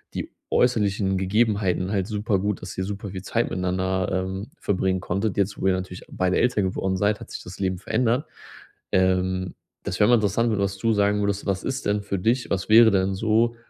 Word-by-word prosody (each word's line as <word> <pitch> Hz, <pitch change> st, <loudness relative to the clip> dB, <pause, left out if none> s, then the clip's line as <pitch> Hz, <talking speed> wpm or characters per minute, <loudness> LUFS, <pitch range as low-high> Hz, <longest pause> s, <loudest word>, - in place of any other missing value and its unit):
die -, -, -4 dB, 0.2 s
äußerlichen 100 Hz, -5 st, +2 dB
Gegebenheiten 95 Hz, -2 st, +1 dB
halt 100 Hz, -3 st, 0 dB
super 105 Hz, -1 st, 0 dB
gut, 100 Hz, 0 st, -2 dB
dass 90 Hz, -, -7 dB
ihr 95 Hz, -, -2 dB
super 100 Hz, +1 st, -5 dB
viel 95 Hz, 0 st, -6 dB
Zeit 115 Hz, +4 st, -1 dB
miteinander, 95 Hz, 0 st, -1 dB
ähm, 95 Hz, +2 st, -2 dB
verbringen 95 Hz, -1 st, 0 dB
konntet. 100 Hz, +3 st, -2 dB
Jetzt, 100 Hz, 0 st, -1 dB
wo -, -, +1 dB
ihr 95 Hz, -, +4 dB
natürlich 95 Hz, 0 st, -5 dB
beide 95 Hz, 0 st, 0 dB
älter 125 Hz, -4 st, +2 dB
geworden 95 Hz, 0 st, -1 dB
seid, 105 Hz, +2 st, +1 dB
hat 115 Hz, -, -11 dB
sich -, -, -7 dB
das 90 Hz, +1 st, -10 dB
Leben 95 Hz, -1 st, -1 dB
verändert. 115 Hz, -, 0 dB, 0.7 s
Ähm, 95 Hz, 0 st, +1 dB, 0.3 s
das 90 Hz, -, -4 dB
wäre 105 Hz, -, +5 dB
mal 120 Hz, -, +7 dB
interessant, 110 Hz, +1 st, +1 dB
was 100 Hz, -1 st, -1 dB
du 115 Hz, +3 st, +1 dB
sagen 105 Hz, 0 st, +2 dB
würdest, 100 Hz, 0 st, -1 dB
was 95 Hz, -2 st, -1 dB
ist 135 Hz, 0 st, -3 dB
denn 105 Hz, 0 st, +1 dB
für 100 Hz, -1 st, -3 dB
dich 120 Hz, +6 st, 0 dB
was 95 Hz, +1 st, -2 dB
wäre 115 Hz, +1 st, +8 dB
denn 95 Hz, 0 st, +1 dB
so, 115 Hz, +3 st, +2 dB
100 Hz, 200 wpm, -24 LUFS, 95-110 Hz, 0.7 s, wäre